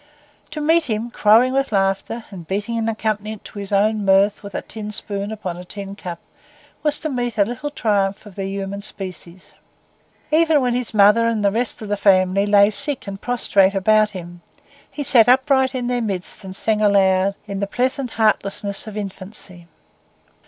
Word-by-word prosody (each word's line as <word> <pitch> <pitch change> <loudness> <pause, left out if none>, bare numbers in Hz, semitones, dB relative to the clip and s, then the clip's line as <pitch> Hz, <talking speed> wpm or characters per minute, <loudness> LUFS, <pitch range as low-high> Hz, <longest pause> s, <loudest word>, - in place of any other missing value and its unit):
To 305 -1 -5
meet 325 +2 +3
him, 230 0 -3
crowing 230 +4 +4
with 275 -1 0
laughter 195 +3 -1
and 175 -5 -10
beating 205 +5 -2
an 225 0 -1
accompaniment 215 -1 -3
to 205 - -9
his 200 0 -7
own 210 +1 +2
mirth 195 +1 +3
with 200 -1 -9
a - - -3
tin 210 -1 -8
spoon 205 -1 -4
upon 185 -5 -5
a 180 - -8
tin 195 +1 -8
cup, 175 -4 -7 0.6
was 300 -1 0
to 310 - -2
meet 245 -3 -3
a 200 - +4
little 245 +6 -5
triumph 205 -7 -1
of 205 - -12
the 195 0 -4
human 195 0 -5
species. 185 -3 -7 0.8
Even 320 -1 +4
when 250 -2 0
his 245 -1 -1
mother 210 +3 +5
and 220 -3 0
the 200 - +4
rest 230 +1 -2
of 210 - -7
his 205 - -1
family 195 0 +3
lay 205 0 +5
sick 275 +5 +1
and 195 -1 -7
prostrate 200 -5 +2
around 215 +2 +3
him, 175 -3 -9 0.5
he 290 - -5
sat 245 -4 +5
upright 265 +1 +3
in 250 -1 -2
their 245 0 -1
midst 195 -3 -3
and 190 -1 -7
sang 215 +1 +1
aloud 195 -1 +3
in 200 -2 -5
the 200 - -1
pleasant 255 +3 -1
heartlessness 200 -2 0
of 215 -1 -7
infancy. 190 -3 -8
210 Hz, 185 wpm, -20 LUFS, 195-235 Hz, 0.8 s, mother